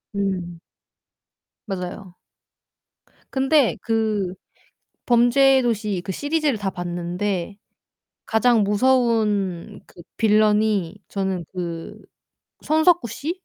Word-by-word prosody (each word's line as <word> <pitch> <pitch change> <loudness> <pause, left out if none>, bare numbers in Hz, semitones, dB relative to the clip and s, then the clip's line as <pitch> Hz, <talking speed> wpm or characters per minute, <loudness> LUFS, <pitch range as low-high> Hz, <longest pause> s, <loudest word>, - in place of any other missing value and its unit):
음. 180 -4 -3 1.1
맞아요. 185 -1 -6 1.2
근데 270 -1 +2
그 215 -5 -1 0.7
범죄도시 240 -5 +3
그 - - -5
시리즈를 290 - -1
다 195 -2 -2
봤는데 175 +2 -3 0.7
가장 225 -1 +3
무서운 210 -4 +1
그 175 - -15 0.2
빌런이 210 -4 +2
저는 190 -4 -3
그 170 -2 -6 0.6
손석구 315 -3 +3
씨? 315 - -4
210 Hz, 160 characters per minute, -22 LUFS, 185-240 Hz, 1.2 s, 범죄도시